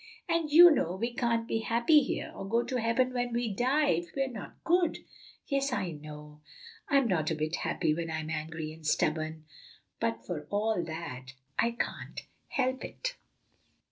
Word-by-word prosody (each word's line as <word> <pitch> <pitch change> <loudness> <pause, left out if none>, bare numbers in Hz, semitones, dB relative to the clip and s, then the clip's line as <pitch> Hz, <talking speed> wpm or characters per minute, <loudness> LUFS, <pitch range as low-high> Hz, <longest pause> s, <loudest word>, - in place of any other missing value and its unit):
And 335 -2 +1
you 340 +3 +10
know 180 - +1
we 235 +5 -2
can't 230 -1 0
be 225 - 0
happy 235 +7 +4
here, 270 - -3
or 195 - -7
go 230 +2 +2
to 255 - -2
heaven 250 +3 +2
when 245 -1 -1
we 235 -3 0
die, 270 +8 +2
if 170 +1 +1
we're 270 -1 +1
not 220 -4 -8
good." 345 -1 +2 0.4
"Yes, 275 -1 0
I 190 -8 -1
know," 150 0 -10 0.5
said - - -4
Lulu; 275 - +7
"I'm - - 0
not 160 -7 +1
a 160 - 0
bit 155 +2 -1
happy 160 -4 0
when 165 +1 -3
I'm 160 0 -3
angry 155 0 -4
and 160 0 -15
stubborn, 155 0 0 0.5
but 115 0 -1
for 150 -1 -5
all 210 -1 +1
that 140 -6 -6 0.3
I 235 - +4
can't 235 - -4 0.3
help 260 -1 0
it." - - -4
210 Hz, 180 wpm, -30 LUFS, 155-255 Hz, 0.5 s, you